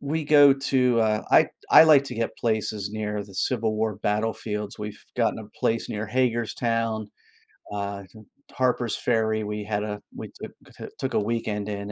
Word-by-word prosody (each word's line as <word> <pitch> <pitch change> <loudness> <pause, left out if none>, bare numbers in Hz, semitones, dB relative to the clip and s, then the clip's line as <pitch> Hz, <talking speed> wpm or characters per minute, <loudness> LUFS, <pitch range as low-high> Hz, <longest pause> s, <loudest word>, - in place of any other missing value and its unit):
We 155 +2 -2
go 145 -2 +7
to, 130 -3 +1
uh 110 -1 +1
I - - +6 0.2
I - - +9
like 145 -3 +6
to 125 - -7
get 115 0 -3
places 110 -3 -2
near 105 -1 -3
the 100 - -15
Civil 110 -2 0
War 110 -2 -1
battlefields. 105 0 -2
We've 105 0 -7
gotten 115 -2 +1
a 105 -1 -9
place 115 0 0
near 105 +1 -4
Hagerstown, 115 -3 -1 0.6
uh, 100 -1 -4 0.5
Harpers 125 -2 0
Ferry, 110 -2 0
we 105 0 -4
had 105 0 -2
a 105 -1 -5
we - - -7
took - - -8 0.2
to - - -8
took 135 - -3
a - - +3
weekend 105 -1 -2
in, 100 0 -5
110 Hz, 170 wpm, -25 LUFS, 105-120 Hz, 0.6 s, I